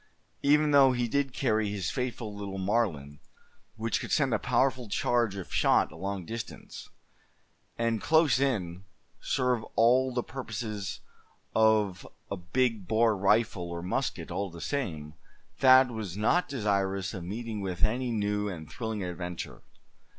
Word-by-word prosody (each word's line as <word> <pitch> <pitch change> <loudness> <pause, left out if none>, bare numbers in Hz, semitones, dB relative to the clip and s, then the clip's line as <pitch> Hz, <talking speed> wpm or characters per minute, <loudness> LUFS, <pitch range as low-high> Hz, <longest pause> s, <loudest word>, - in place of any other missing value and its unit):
Even 150 +1 +4
though 135 -2 +6
he 120 -1 0
did 140 +3 0
carry 110 -5 0
his 100 -3 -2
faithful 125 -4 -3
little 100 -1 -5
Marlin, 95 -9 -1 0.6
which 115 0 -1
could - - -6
send 135 -5 +2
a 110 - +2
powerful 125 -2 +1
charge 120 -1 +1
of 95 -2 -7
shot - - +3
a - - -12
long 100 -2 -4
distance; 115 +4 -7 0.9
and 115 -2 0
close 160 -4 +4
in, 95 -10 -1 0.4
serve 125 -3 0
all 125 +3 +4
the 120 -1 -1
purposes 110 -6 -5 0.5
of 110 -4 +2 0.2
a - - 0
big 105 +3 -1
bore 110 +1 +3
rifle, 100 -2 +1
or 85 0 -5
musket, 90 - -2
all 100 -1 -2
the 85 -1 -11
same, 80 - -3 0.5
Thad 130 -1 +7
was 105 -5 -5
not 145 +11 +2
desirous 100 -6 -1
of 90 - -6
meeting 110 +3 -5
with 95 -3 -3
any 120 +4 +1
new 105 -1 0
and 80 -5 -7
thrilling 110 -4 -4
adventure. 90 -1 -6
110 Hz, 145 wpm, -29 LUFS, 95-125 Hz, 0.9 s, Thad